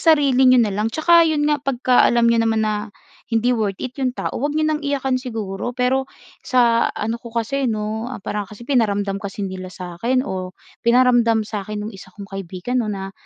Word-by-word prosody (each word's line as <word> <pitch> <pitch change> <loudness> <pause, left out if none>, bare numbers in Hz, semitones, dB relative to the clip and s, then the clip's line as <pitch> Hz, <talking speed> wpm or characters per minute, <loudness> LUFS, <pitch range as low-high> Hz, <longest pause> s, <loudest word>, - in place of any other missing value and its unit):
sarili 265 -3 +3
niyo 255 -1 +6
na 210 - -1
lang. 210 +3 -1
Tsaka 335 +6 +4
'yon 305 -2 +1
nga, 295 0 +2
pagkaalam 250 -3 +3
niyo 235 0 +4
naman 220 -1 +1
na 215 0 0 0.6
hindi 230 +2 +2
worth 205 -4 -2
it 255 0 -5
'yong 260 -2 +1
tao, - - -3
huwag 290 +3 -1
niyo 310 0 +2
nang 305 0 -2
iyakan 275 -2 0
siguro. 220 -4 -4
Pero 260 +1 +1 0.4
sa 235 -2 +3
ano 225 +2 -2
ko 235 0 -11
kasi 260 +4 0
'no, 215 +1 -2
ah, 220 - -8
parang 205 -1 -3
kasi 210 +3 -12
pinaramdam 205 -6 0
kasi 200 0 -5
nila 185 -1 -5
sa 180 -2 -9
akin, 255 +4 +1
o 185 -6 -5 0.3
pinaramdam 235 -2 +4
sa 210 -1 -5
akin 210 -1 -4
nung 215 - -6
isa 190 -1 -13
kong 200 -1 -9
kaibigan 195 +5 -4
'no 215 - -4
na, 195 -1 -5
230 Hz, 205 wpm, -21 LUFS, 205-255 Hz, 0.6 s, niyo